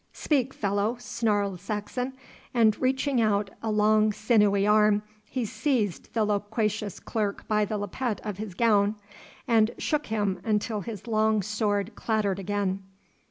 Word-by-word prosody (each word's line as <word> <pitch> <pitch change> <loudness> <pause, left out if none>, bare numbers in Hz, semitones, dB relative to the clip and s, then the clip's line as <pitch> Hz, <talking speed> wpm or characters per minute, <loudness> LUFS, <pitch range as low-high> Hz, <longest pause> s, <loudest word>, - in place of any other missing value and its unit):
'Speak, 270 -4 0
fellow,' 205 +2 -1
snarled 205 -6 -1
Saxon, 215 +6 -3 0.4
and 220 -3 +5
reaching 265 0 +1
out 205 -2 +1
a 225 - -2
long 215 0 +4
sinewy 210 -2 +3
arm 210 0 +4 0.3
he 255 -3 -2
seized 220 - -1
the 220 -2 +3
loquacious 210 0 -1
clerk 210 -3 -3
by 210 -1 +2
the 210 +1 -3
lappet 210 +3 -3
of 210 -3 -4
his 210 -4 -6
gown, 210 -1 +3 0.5
and 225 -2 +4
shook 300 -1 -1
him 205 -4 -1
until 215 0 0
his 215 -2 -7
long 220 -2 +2
sword 210 0 -1
clattered 210 -3 0
again. 195 0 -1
215 Hz, 140 wpm, -27 LUFS, 205-225 Hz, 0.5 s, and